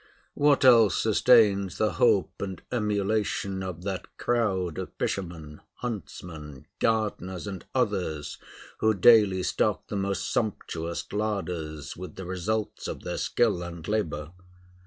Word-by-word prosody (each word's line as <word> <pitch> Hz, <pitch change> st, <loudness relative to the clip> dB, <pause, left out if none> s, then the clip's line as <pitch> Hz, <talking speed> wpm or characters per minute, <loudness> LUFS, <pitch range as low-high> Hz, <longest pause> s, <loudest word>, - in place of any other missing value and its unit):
What 145 Hz, -2 st, +3 dB
else 115 Hz, -6 st, +6 dB
sustains 105 Hz, -4 st, +4 dB
the 110 Hz, -2 st, +2 dB
hope 85 Hz, -, +2 dB
and 95 Hz, -3 st, -4 dB
emulation 105 Hz, -3 st, 0 dB
of 90 Hz, -2 st, -6 dB
that 95 Hz, -1 st, -4 dB
crowd 95 Hz, -8 st, 0 dB
of -, -, -5 dB
fishermen, 80 Hz, -5 st, -4 dB
huntsmen, 80 Hz, -, -7 dB
gardeners, 105 Hz, -5 st, -1 dB
and 95 Hz, -3 st, -6 dB
others 90 Hz, -, -1 dB, 0.4 s
who 110 Hz, 0 st, +3 dB
daily 100 Hz, -2 st, +6 dB
stock -, -, 0 dB
the -, -, -3 dB
most 100 Hz, 0 st, -1 dB
sumptuous 85 Hz, -6 st, -2 dB
larders 90 Hz, -8 st, -3 dB
with 90 Hz, +1 st, -8 dB
the 95 Hz, -, -7 dB
results 100 Hz, +4 st, -2 dB
of -, -, -5 dB
their -, -, -3 dB
skill 85 Hz, -, +1 dB
and 85 Hz, -1 st, -7 dB
labor? 85 Hz, -8 st, -2 dB
95 Hz, 125 wpm, -27 LUFS, 85-110 Hz, 0.4 s, else